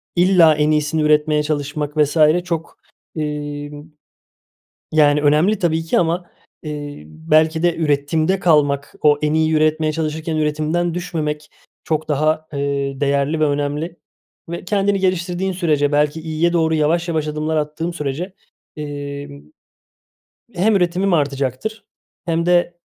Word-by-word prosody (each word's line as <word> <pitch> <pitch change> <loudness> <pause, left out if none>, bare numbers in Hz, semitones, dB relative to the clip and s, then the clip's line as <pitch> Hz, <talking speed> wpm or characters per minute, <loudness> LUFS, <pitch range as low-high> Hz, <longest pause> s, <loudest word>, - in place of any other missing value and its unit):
illa 175 -3 +5
en 150 +1 +2
iyisini 150 +1 +1
üretmeye 150 0 +3
çalışmak 150 0 -3
vs. 150 +2 +2 0.3
çok, 165 -2 -4 0.4
iii, 145 -1 -4 1.2
yani, 150 -1 +4
önemli 155 +8 +3
tabii 165 -2 0
ki 160 - +1
ama, 175 +1 -1 0.3
iii, 145 - -7
belki 155 - +1
de 175 -1 +2
üretimde 155 +4 +1
kalmak, 145 -5 +2
o 145 -1 +5
en 150 +1 +1
iyi 160 0 +2
üretmeye 155 0 +2
çalışırken 160 0 -3
üretimden 155 +3 0
düşmemek 155 -4 -4 0.3
çok 155 -2 -2
daha, 155 +2 +1
ııı, 140 -1 -2
değerli 140 +2 +1
ve 155 - +4
önemli 145 +4 -2 0.5
ve 170 +1 -6
kendini 200 +1 +1
geliştirdiğin 185 0 -1
sürece, 150 -5 +1
belki 150 +2 +1
iyiye 160 +2 0
doğru 160 -2 +2
yavaş 165 +3 +1
yavaş 155 -2 -1
adımlar 155 +1 -2
attığım 155 +3 -2
sürece, 160 +6 -4 0.4
imm, 145 -1 -7 1.1
hem 210 +5 +2
üretimim 180 +1 +1
artacaktır 140 - -2 0.4
hem 170 0 0
de, 175 0 +2
155 Hz, 130 wpm, -19 LUFS, 145-170 Hz, 1.2 s, illa